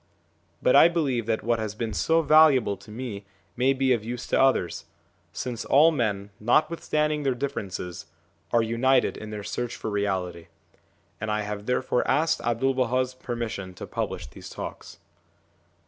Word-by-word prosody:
But - - +4
I - - +9
believe 140 -10 -1
that 110 -1 0
what 115 0 +1
has 110 -1 -4
been 110 -1 -3
so 165 +7 +2
valuable 150 -9 +5
to 105 - -17
me 110 -2 -6 0.3
may 130 +2 +3
be 130 -1 +2
of 115 -3 -1
use 120 +1 -5
to - - +3
others, 135 -10 +1 0.5
since 120 -3 -4
all 155 +4 +5
men, 105 -8 -2
notwithstanding 150 +4 +1
their 135 -3 0
differences, 100 -10 -5 0.4
are 115 -1 +3
united 125 +3 +2
in 110 - -8
their 105 -1 -6
search 120 +3 -4
for 110 - -5
reality; 95 -4 -2 0.7
and 110 - -4
I 105 0 0
have 105 0 -5
therefore 125 0 +1
asked 160 +2 +2
'Abdul 120 +3 +1
Baha's 130 0 0
permission 110 -7 -5
to - - -7
publish - - -4
these - - -11
talks. - - -8
120 Hz, 160 wpm, -26 LUFS, 105-135 Hz, 0.7 s, I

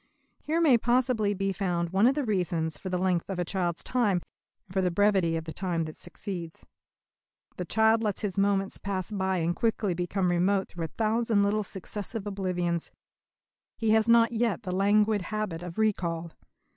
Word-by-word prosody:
Here 320 +2 0
may 285 -8 +5
possibly 235 -4 +1
be 195 0 -1
found 175 -3 -1
one 195 +5 +4
of 270 - +3
the 295 - 0
reasons 175 -7 -1
for 190 - -6
the 180 - 0
length 180 -1 0
of 195 - -3
a 175 - -1
child's 175 -2 -2
time, 215 -8 +1 0.5
and 185 - -15
for 190 - +2
the 180 - +2
brevity 190 -2 +2
of 160 - -4
the 160 0 -7
time 175 -4 -1
that 155 -1 -7
succeeds. 170 -5 -7 0.9
The - - -3
child 220 0 +3
lets 210 -3 -1
his 200 -3 -2
moments 195 -1 +1
pass 190 0 -3
by 190 -2 0
and 170 0 0
quickly 220 -4 0
become 180 +1 0
remote 190 +3 +1
through 170 -2 -4
a - - -10
thousand 225 -1 +2
little 205 +1 +1
successive 205 +2 -6
oblivions. 180 -4 -2 0.9
He 225 -2 +1
has 220 +1 +3
not 230 0 +6
yet 230 -1 0
the 180 -2 -3
languid 205 +2 +3
habit 200 -3 -3
of 175 -1 -8
recall. 170 -6 0
195 Hz, 185 wpm, -28 LUFS, 175-215 Hz, 0.9 s, not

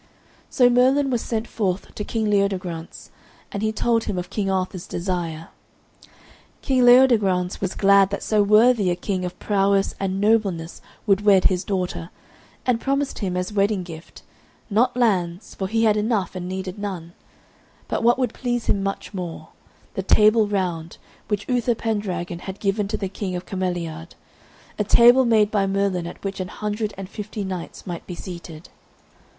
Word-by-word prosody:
So 250 - +4
Merlin 260 +3 +3
was 240 -2 0
sent 225 0 -3
forth 195 -4 -2
to 210 - -4
King 220 +1 -2
Leodegrance, 190 -5 -2 0.4
and 200 - -4
he 215 0 +1
told 230 +1 +1
him 200 - -3
of 180 +1 -5
King 200 -1 -1
Arthur's 185 -1 -2
desire. 170 -3 -3 1.1
King 260 -3 +3
Leodegrance 215 -8 +4
was 190 -2 -2
glad 200 -1 +5
that 200 - -4
so 215 -1 +2
worthy 215 0 +4
a 175 - +1
king 185 +1 -3
of 180 0 -6
prowess 195 -1 +1
and 190 -1 -1
of - - -3
nobleness 195 -7 0 0.2
would 200 -2 +3
wed 200 -3 +5
his 185 -1 +2
daughter, 180 -3 -3 0.6
and 240 -2 +1
promised 275 +1 -1
him 185 -3 -2
as 180 +3 -3
wedding 200 -1 +1
gift, 165 -1 -11 0.5
not 240 +4 +2
lands, 190 -5 0
for 190 - -3
he 225 +3 +1
had 215 -2 +4
enough 210 -3 0
and 180 0 -5
needed 190 +1 -5
none, 180 -5 -5 0.7
but - - -2
what 240 +2 +4
would 250 -4 -1
please 240 -2 -2
him 195 - +1
much 195 +1 -4
more, 175 -4 -6 0.4
the - - -2
Table 215 +3 +4
Round, 175 -5 -2 0.3
which 210 0 -2
Uther 245 -2 +1
Pendragon 185 -6 -3
had 190 +2 -8
given 200 0 0
to 215 +1 -2
the 195 - -3
King 185 -1 -4
of 180 - -5
Cameliard, 175 -3 -4 0.6
a - - +3
table 240 +5 +6
made 215 -3 +3
by 200 -2 +1
Merlin 195 -3 0
at 175 - -10
which 195 0 -4
an 185 - -3
hundred 210 +2 -3
and 195 -1 -6
fifty 210 +1 -6
knights 185 -3 -6
might 175 -3 -6
be 180 - -6
seated. 170 -2 -9
195 Hz, 170 wpm, -23 LUFS, 180-220 Hz, 1.1 s, table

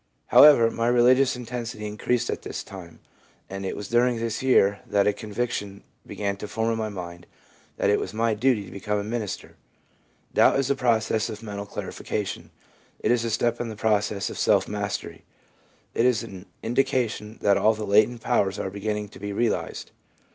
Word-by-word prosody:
However, 130 -6 +8
my 115 0 -1
religious 125 +2 +4
intensity 120 -3 -6
increased 105 +3 -1
at - - -4
this - - -6
time, 90 -4 -11 0.5
and 95 0 -5
it 95 - -3
was 105 - -6
during 120 +1 +2
this 115 -1 -3
year 105 -6 +3
that 100 -1 +2
a 105 - +3
convic 110 +4 -3
tion 100 -2 -5 0.2
began 100 -1 -3
to 105 - -6
form 115 +1 -1
in 115 - -1
my 110 -1 -2
mind 90 -3 -8 0.5
that 100 - +2
it 105 - +3
was 95 - -4
my 115 +1 +1
duty 110 -1 +1
to 90 - -12
become 105 +2 -2
a 100 - -2
minister/ 110 -1 -5 0.8
Doubt - - +5
is 135 0 +1
a - - +2
process 115 -3 +1
of 110 0 -7
mental 100 -1 -6
clarification; 100 0 -5 0.5
it - - +1
is 120 -1 +2
a 115 - -1
step 115 +2 0
in 120 - -3
the 110 - -6
process 105 -1 0
of - - -7
self - - +3
mastery; - - -4 0.7
it 120 - +3
is 120 -3 +1
an 95 -4 -10 0.2
indication 120 -3 -1
that 100 -1 +4
all 110 +1 +3
the 110 0 -4
latent 110 +4 +3
powers 95 -2 +1
are 95 - -3
begin 105 +2 -2
ning 105 -1 -5
to - - -14
be 100 +1 -5
realised. 115 +3 -2
110 Hz, 190 wpm, -25 LUFS, 100-120 Hz, 0.8 s, However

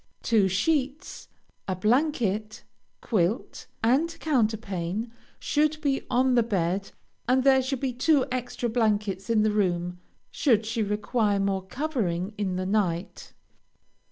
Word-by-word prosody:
Two 215 -5 +3
sheets, 275 - -1 0.4
a 185 - -1
blanket, 215 - 0 0.4
quilt, 210 +1 -1 0.2
and 265 +9 +3
counterpane, 220 - -1 0.3
should 305 +1 +1
be 280 -3 0
on 255 +1 +3
the 240 - +5
bed, 195 -3 -1 0.4
and 255 +1 +3
there 265 -1 +5
should 260 0 -3
be 265 -2 -1
two 265 +2 +3
extra 250 -1 -2
blankets 210 -4 0
in 220 -2 +3
the 215 - +2
room, 180 -3 -1 0.3
should 225 -6 +2
she 225 +1 -2
require 210 0 0
more 195 -1 0
covering 200 - -2
in 195 -3 -2
the 185 0 -2
night. 190 -3 -2
220 Hz, 130 wpm, -26 LUFS, 195-255 Hz, 0.4 s, the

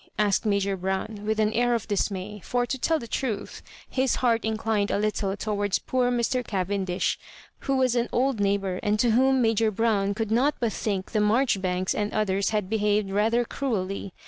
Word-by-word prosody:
asked 210 +1 +2
Major 200 -1 +1
Brown, 190 +3 -3
with 220 0 0
an 215 0 +2
air 240 +1 +2
of 230 - -3
dismay; 205 0 -2
for, 245 0 0
to 265 +2 -3
tell 320 +5 +2
the 235 - -7
truth, 220 -3 -3 0.3
his 260 -1 +1
heart 235 -3 +1
inclined 220 -2 0
a - - +1
little 205 -1 -1
towards 205 -2 0
poor 250 -1 0
Mr. 245 +1 0
Cavendish, 190 -3 -1 0.4
who 275 -1 -1
was 255 -2 +2
an 240 0 0
old 260 -2 +1
neighbour, 195 -2 0
and 210 0 +1
to 240 0 +3
whom 260 +2 +3
Major 225 -1 +2
Brown 205 -2 +1
could 220 0 -2
not 265 +6 +3
but 230 -4 0
think 195 -3 -3
the 215 - +1
Maijoribanks 200 -5 +1
and 210 0 -2
others 200 -2 +1
had 210 -3 -1
behaved 210 -1 +1
rather 225 +4 +2
cruelly. 200 -8 -3
215 Hz, 185 wpm, -26 LUFS, 200-235 Hz, 0.4 s, to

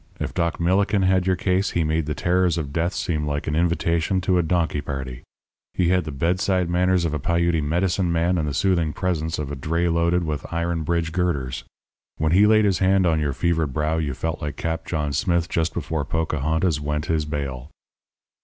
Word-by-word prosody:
If - - -3
Doc 85 -1 -1
Millikin 95 +3 +2
had 95 0 +2
your 95 - +3
case, 95 +2 0
he 85 - +2
made 80 0 0
the 75 - -2
terrors 90 0 +1
of 70 -4 -4
death 85 +3 0
seem 75 -3 -2
like 75 0 -2
an 75 - -1
invitation 85 +2 +1
to 90 -1 +2
a - - +4
donkey 80 -3 0
party. 65 -4 -5 0.5
He 90 -2 +2
had 90 -2 +2
the 80 - -5
bedside 90 +4 0
manners 90 0 +2
of 80 - -1
a 75 - -1
Piute 85 +1 +1
medicine 90 +3 0
man 85 +2 +1
and 75 - -1
the 70 - -2
soothing 85 -5 +1
presence 80 -4 -2
of 75 -2 -4
a - - -3
dray 85 +6 -1
loaded 85 +1 +2
with 75 -4 -4
iron 85 0 -1
bridge 80 0 -1
girders. 70 -8 -2 0.5
When 80 0 0
he 100 +4 +5
laid 110 0 +5
his 95 -3 +2
hand 95 0 +3
on 80 -2 +2
your 75 -2 -1
fevered 80 -2 0
brow 75 +3 0
you 70 -4 -2
felt 80 +3 -3
like 75 -2 -4
Cap 80 0 -3
John 75 -3 -2
Smith 85 +3 +1
just 80 -1 0
before 80 -2 -3
Pocahontas 80 +1 0
went 75 +1 -2
his 80 -2 0
bail. 70 -3 -4
85 Hz, 205 wpm, -23 LUFS, 75-90 Hz, 0.5 s, he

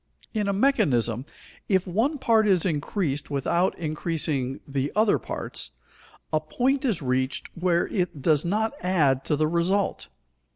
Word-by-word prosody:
In 210 -2 0
a - - +2
mechanism, 140 - +2 0.4
if 190 -2 +3
one 225 - 0
part 225 -4 +3
is 185 -3 +3
increased 150 -2 -1
without 160 +6 0
increasing 155 -4 -2
the 140 0 -2
other 215 0 +3
parts, - - -5 0.6
a 155 - +4
point 255 - 0
is 215 - 0
reached 130 +1 -2
where 175 0 +1
it 175 -5 -2
does 150 +1 +3
not 215 +7 0
add 150 -8 +2
to 150 - +1
the 155 +1 +1
result. 175 +5 0
170 Hz, 140 wpm, -25 LUFS, 145-205 Hz, 0.6 s, a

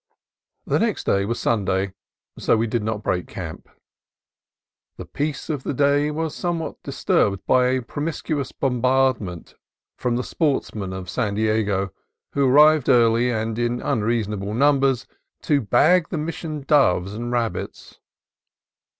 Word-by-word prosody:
The - - +1
next - - 0
day 100 0 +1
was 115 +3 -2
Sunday, 95 -3 0 0.4
so - - +2
we 115 - +1
did 115 0 -1
not 110 0 -3
break 90 -1 -1
camp. - - -8 1.3
The - - -7
peace 145 -1 -3
of 150 -4 -2
the 135 - -4
day 145 +2 +2
was 155 0 -3
somewhat 170 -3 -3
dis - - -8
turbed 100 -2 +2
by 125 -1 +4
a 130 0 0
promiscuous 145 +1 -3
bombardment 125 - 0 0.5
from 120 -1 0
the 125 - -1
sportsmen 115 - -1
of 95 -1 -6
San 105 +1 -2
Diego, 105 -3 0 0.4
who 140 -2 +2
arrived 150 +1 +5
early, 120 -1 +4
and 110 -1 -2
in 120 0 0
unreasonable 105 -5 -1
numbers, 135 -1 +2 0.4
to 145 -2 +2
bag 155 - +3
the 175 - -3
Mission 155 -1 -4
doves 100 - +2
and 120 +3 -4
rabbits. 120 -2 -4
120 Hz, 140 wpm, -22 LUFS, 105-145 Hz, 1.3 s, arrived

